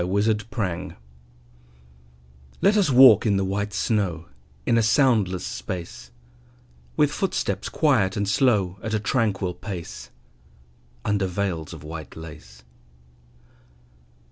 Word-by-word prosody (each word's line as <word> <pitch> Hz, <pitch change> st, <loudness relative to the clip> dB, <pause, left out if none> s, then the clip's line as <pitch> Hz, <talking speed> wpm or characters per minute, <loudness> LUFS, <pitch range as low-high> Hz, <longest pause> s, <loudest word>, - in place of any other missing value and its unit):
VELVET 105 Hz, +3 st, 0 dB
SHOES 95 Hz, -7 st, -3 dB, 1.7 s
Let 200 Hz, +2 st, +3 dB
us 200 Hz, -6 st, +3 dB
walk 125 Hz, -5 st, +7 dB
in 100 Hz, -2 st, +2 dB
the 95 Hz, -, 0 dB
white 100 Hz, +2 st, -2 dB
snow 95 Hz, -5 st, -1 dB, 0.4 s
In 115 Hz, -, +2 dB
a 115 Hz, -, +4 dB
soundless 110 Hz, -6 st, +2 dB
space; 95 Hz, +7 st, -6 dB, 0.9 s
With -, -, +3 dB
footsteps -, -, -2 dB
quiet 110 Hz, -11 st, +2 dB
and 100 Hz, 0 st, -1 dB
slow, 100 Hz, -4 st, +1 dB
At 110 Hz, 0 st, -2 dB
a -, -, +1 dB
tranquil 105 Hz, -5 st, 0 dB
pace, 90 Hz, -3 st, -8 dB, 1.0 s
Under 100 Hz, -2 st, +1 dB
veils 90 Hz, -4 st, -3 dB
of 80 Hz, -3 st, -10 dB
white 80 Hz, 0 st, -8 dB
lace. 65 Hz, -7 st, -12 dB
100 Hz, 115 wpm, -24 LUFS, 90-110 Hz, 1.7 s, walk